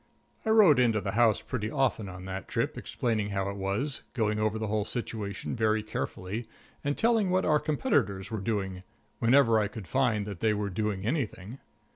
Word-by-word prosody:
I - - +2
wrote 200 - +7
in 120 -2 +4
to 110 - +1
the 100 - -2
house 110 0 +3
pretty 110 -4 -3
often 125 -6 0
on 90 0 -9
that 95 0 -5
trip, - - -1
explaining 110 -4 -2
how 100 -1 -1
it - - -7
was, 100 +9 -2
going 105 -3 +1
over 110 0 +1
the 110 - -2
whole 105 0 0
situation 110 -2 -4
very 110 -2 +1
carefully, 110 +1 -4 0.4
and 145 0 -1
telling 225 -4 +3
what 185 +1 +2
our 150 -1 +4
competitors 100 - 0
were 110 -3 -3
doing, 95 -3 -2 0.4
wherever 115 -2 +5
I 105 - +1
could 105 -3 -9
find 120 -6 +1
that 100 -4 -6
they 110 +1 +2
were 105 -1 -2
doing 105 0 -2
anything. 120 - -3
110 Hz, 190 wpm, -29 LUFS, 100-125 Hz, 0.4 s, wrote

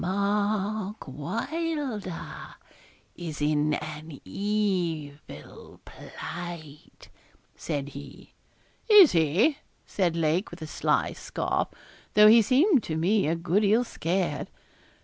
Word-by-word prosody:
'Mark 205 +2 -1
Wylder 290 - -4 0.6
is 165 -4 -6
in 150 0 +1
an 155 -1 -7
evil 170 - -3
plight,' 155 -4 -9 0.5
said 145 -3 -4
he. 140 0 -12 0.6
'Is 410 -7 +9
he?' 175 - +2 0.3
said 175 -4 0
Lake, 165 +3 0
with 170 -1 -9
a - - -4
sly 155 - 0
scoff, - - -2 0.5
though 210 0 +8
he 225 +2 +8
seemed 275 - +4
to 155 -5 -4
me 195 +3 +2
a 165 - +1
good 170 +4 +1
deal 215 +4 +3
scared. 175 -7 -2
180 Hz, 105 wpm, -27 LUFS, 155-215 Hz, 0.6 s, Is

